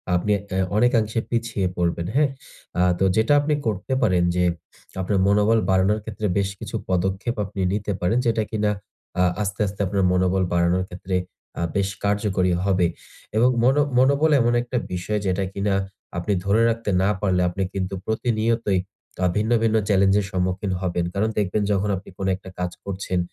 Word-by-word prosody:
আপনি 105 +4 0
উম 95 -2 -2
অনেকাংশে 115 -2 +2
পিছিয়ে 115 -5 -1
পড়বেন, 85 -1 0
হ্যাঁ? 145 -1 +4 0.5
আ - - +4 0.2
তো - - +2
যেটা 110 +6 +3
আপনি 150 +1 0
করতে 105 +5 -2
পারেন 90 -4 +3
যে 90 - +2 0.6
আপনার 95 +1 0
মনোবল 105 +2 +4
বাড়ানোর 95 +3 +3
ক্ষেত্রে 105 -1 -3
বেশ 100 -1 +1
কিছু - - -6
পদক্ষেপ 95 +6 0
আপনি 95 - -8
নিতে 105 0 -2
পারেন 90 +7 +2
যেটা 115 -2 +2
কিনা 105 -1 +1 0.5
আ - - +5 0.2
আস্তে, 100 0 -3
আস্তে 100 - -7
আপনার 100 0 0
মনোবল 95 +1 +2
বাড়ানোর 85 +1 +2
ক্ষেত্রে 90 +1 -4 0.4
আ - - -1
বেশ 100 -1 +1
কার্যকরী 100 -3 +1
হবে। 95 -3 +2 0.5
এবং 125 +3 +5
মনো 135 +4 +4 0.2
মনোবল 140 +5 +4
এমন 120 0 +2
একটা 125 +1 -3 0.2
বিষয় 95 +4 -2
যেটা 95 +1 0
কিনা 100 0 0 0.4
আপনি 95 +4 0
ধরে 105 +4 +3
রাখতে 115 -2 -2
না 100 - +3
পারলে 95 -3 +2
আপনি 95 +2 -2
কিন্তু 95 0 -3
প্রতিনিয়তই 110 -3 0 0.4
আ 90 - +4
ভিন্ন, 110 +2 0
ভিন্ন 110 -1 +2
চ্যালেঞ্জের 100 0 +3
সম্মুখীন 95 +1 -1
হবেন। 90 -1 -1
কারণ 105 +3 +1
দেখবেন 105 +1 +1
যখন 100 +1 +1
আপনি 95 - -9
কোন 95 - -2
একটা 95 0 -12
কাজ 90 0 -1
করছেন, 95 -2 -2
100 Hz, 170 wpm, -23 LUFS, 95-110 Hz, 0.6 s, আ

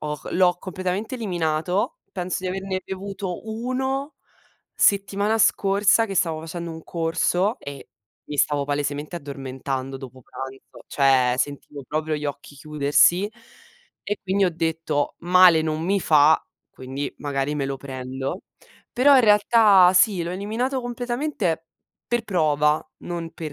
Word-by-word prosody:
ho 150 -1 -4
l'ho 180 -1 +3
completamente 185 +6 -4
eliminato, 180 - -1
penso 180 -1 -3
di 185 - -3
averne 190 0 -3
bevuto 190 0 -6
1, 265 +5 -3 0.6
settimana 200 +2 +2
scorsa 205 +2 +3
che 195 - -5
stavo 160 -3 0
facendo 170 +1 -6
un 160 0 -8
corso 175 +5 0
e 140 -1 -9 0.4
mi 145 - -4
stavo 145 0 +1
palesemente 145 +3 -3
addormentando 135 -2 -5
dopo 130 -1 -11
pranzo, 135 +2 -10
cioè 130 -3 +3
sentivo 145 +1 -4
proprio 155 +1 -2
gli 150 0 -4
occhi 145 0 -6
chiudersi, 150 +7 +2 0.7
e 205 0 -3
quindi 195 +1 +1
ho 180 - +2
detto: 160 -3 -1
"Male 175 -2 +6
non 155 0 -2
mi 195 +3 +1
fa", 155 -1 +5 0.3
quindi 135 +2 -6
magari 140 0 -2
me 140 -2 -2
lo 135 0 -3
prendo. 130 +4 -6 0.5
Però 275 +3 +5
in 260 - +7
realtà 210 -3 +6
sì, 190 -1 +4
l'ho 170 - -4
eliminato 225 +8 -2
completamente 240 - -2 0.4
per 240 -1 0
prova, 155 -6 +1
non 170 -1 -6
per 155 -3 -7
170 Hz, 135 wpm, -23 LUFS, 145-200 Hz, 0.7 s, in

